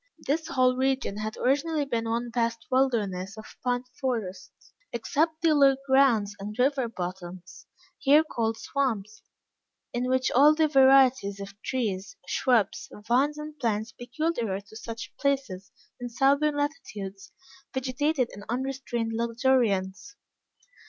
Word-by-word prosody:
This 315 +3 0
whole 255 -5 +2
region 260 -6 0
had 215 0 -4
originally 290 +3 +1
been 230 -4 -2
one 235 +1 -2
vast 230 -1 -1
wilderness 215 -7 0
of 215 - -9 0.2
pine 245 0 0 0.2
forest, 195 -9 -3 0.4
except 310 +8 -1
the 325 -2 +5
low 275 -2 +5
grounds 255 -7 +3
and 210 +2 -7
river 260 0 +2
bottoms, 180 -3 -7 0.3
here 285 +2 +5
called 225 -7 -2
swamps, 220 -7 -2 0.7
in 245 +1 -1
which 260 0 +1
all 290 +4 +6
the 315 0 +3
varieties 265 -7 +5
of 200 0 -7
trees, 200 -7 -3
shrubs, 230 -4 +1 0.2
vines, 275 +5 +2
and 300 0 -8
plants 220 -2 -1
peculiar 245 - -2
to 205 +2 -17
such 230 +1 -7
places, 270 -10 -1 0.3
in 245 0 -5
southern 280 +5 +2
latitudes, 210 -10 -5 0.4
vegetated 265 +1 0
in 205 - -10
unrestrained 250 -2 -2
luxuriance. 235 - 0
245 Hz, 125 wpm, -27 LUFS, 215-275 Hz, 0.7 s, all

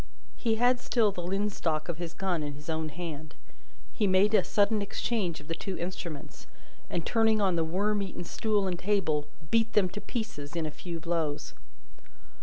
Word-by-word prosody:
He 225 -2 +1
had 245 +2 +4
still 230 -4 +3
the 180 - -5
linstock 180 -4 -1
of 170 -2 -3
his 170 -1 -5
gun 185 -4 0
in 145 -1 -3
his 150 +3 -6
own 160 0 -1
hand. 155 -1 -6 0.6
He 210 - +2
made 195 +3 +4
a - - +6
sudden 205 +1 +3
exchange 200 -3 -1
of 150 - -13
the 165 - -2
two 185 +3 -4
instruments, 170 -4 -6 0.4
and 170 - -2
turning 225 -1 +4
on 190 -3 +3
the 165 - +2
worm 200 +6 +1
eaten 190 -2 -4
stool 210 +2 +1
and 180 -2 -1
table, 180 -7 +1 0.2
beat 225 -1 +3
them 195 -3 +4
to 210 - -6
pieces 170 - -4
in 165 -2 0
a 155 - -2
few 170 +2 -6
blows. 165 -3 -1
180 Hz, 185 wpm, -30 LUFS, 160-210 Hz, 0.6 s, a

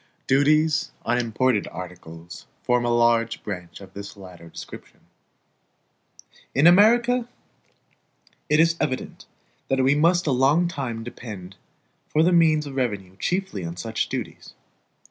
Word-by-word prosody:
Duties 155 +3 +3 0.2
on 120 +1 +1
imported 120 -1 0
articles 85 -2 -10 0.2
form 125 -1 +1
a - - +1
large 115 -1 +2
branch 90 -4 -7
of 95 -1 -13
this 100 +1 -9
latter 90 -4 -12
description. - - -11 1.5
In 140 - +4
America, 235 +7 +5 1.2
it 150 - +3
is 165 +1 +4
evident 130 -4 -3 0.4
that 135 0 +1
we 135 +2 +4
must 170 +4 +3
a 150 - +1
long 140 +7 +3
time 130 -9 -4
depend 105 -6 -9 0.5
for 155 - +2
the 180 +2 +3
means 160 -3 +4
of 140 - -7
revenue 100 -7 -2
chiefly 180 - -2
on 85 +1 -6
such 110 +3 -3
duties. - - -6
125 Hz, 130 wpm, -24 LUFS, 100-155 Hz, 1.5 s, America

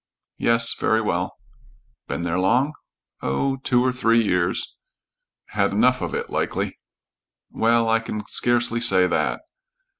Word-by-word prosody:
"Yes. 115 0 +4
Very 110 - +1
well." 110 - -2 0.7
"Been - - -4
there 85 +1 -1
long?" 125 +11 +2 0.5
"Oh, 135 - -1
two 125 -1 +1
or 130 - +1
three 115 -2 +2
years." 90 -5 -1 0.7
"Had - - 0
enough - - +3
of - - -3
it, 470 0 -4
likely?" - - -2 0.7
"Well, 115 0 +2
I 115 0 +3
can 105 -2 -6
scarcely 120 -1 +1
say 95 -6 +4
that." 90 - -1
115 Hz, 130 wpm, -22 LUFS, 100-125 Hz, 0.7 s, Yes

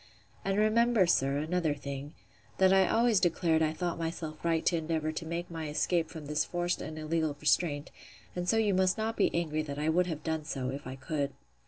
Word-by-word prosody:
And 195 0 0
remember, 220 0 +4
sir, 140 -5 +2
another 160 0 0
thing, 140 +1 -7 0.4
that 190 0 +5
I 190 -1 +5
always 230 -2 +3
declared 165 -2 +2
I 155 -1 +2
thought 170 +1 -3
myself 160 -2 -4
right 165 -1 +1
to 175 - +3
endeavour 160 -1 -1
to 160 +1 -5
make 170 +1 -4
my 160 -2 -4
escape 165 +2 +1
from 160 -2 -8
this 150 +1 0
forced 175 0 -2
and 155 - -6
illegal 155 -1 -1
restraint; 150 -1 +1 0.4
and 180 0 -2
so 225 - +3
you 215 -3 +3
must 185 0 +2
not 220 +1 -1
be - - +3
angry 155 -2 -1
that 145 -2 -5
I 150 +2 0
would 180 +3 +3
have 155 -3 -4
done 160 -1 -2
so, 135 -4 -3
if 140 +1 -6
I 130 - -5
could. 140 +1 -3
160 Hz, 210 wpm, -30 LUFS, 150-180 Hz, 0.4 s, that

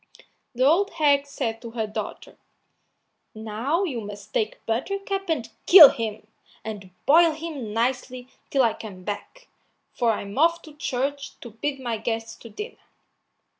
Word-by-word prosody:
So - - -20 0.3
the 255 +2 +2
old 360 +8 +4
hag 285 -2 +3
said 230 -5 -3
to 235 - -7
her 220 - 0
daughter: 210 - -6 1.0
"Now 225 - -1
you 265 -11 -3
must 205 0 -10
take 215 0 -2
Buttercup 390 - -2
and 275 -8 -1 0.2
kill 335 -6 +12
him, 220 -2 -4 0.4
and 205 -4 -7 0.2
boil 330 +2 +6
him 305 -8 -6
nicely 250 +2 -2 0.2
till 270 -2 +3
I 230 -2 +3
come 195 -5 -10
back, 355 - -7 0.5
for 235 -2 +2
I'm 200 +3 -5
off 335 +2 +3
to 310 - -13
church 275 0 -3
to 235 - -9
bid 275 +6 -3
my 235 -4 -3
guests 225 0 -3
to 230 - -12
dinner." 420 - -8
250 Hz, 155 wpm, -24 LUFS, 220-305 Hz, 1.0 s, kill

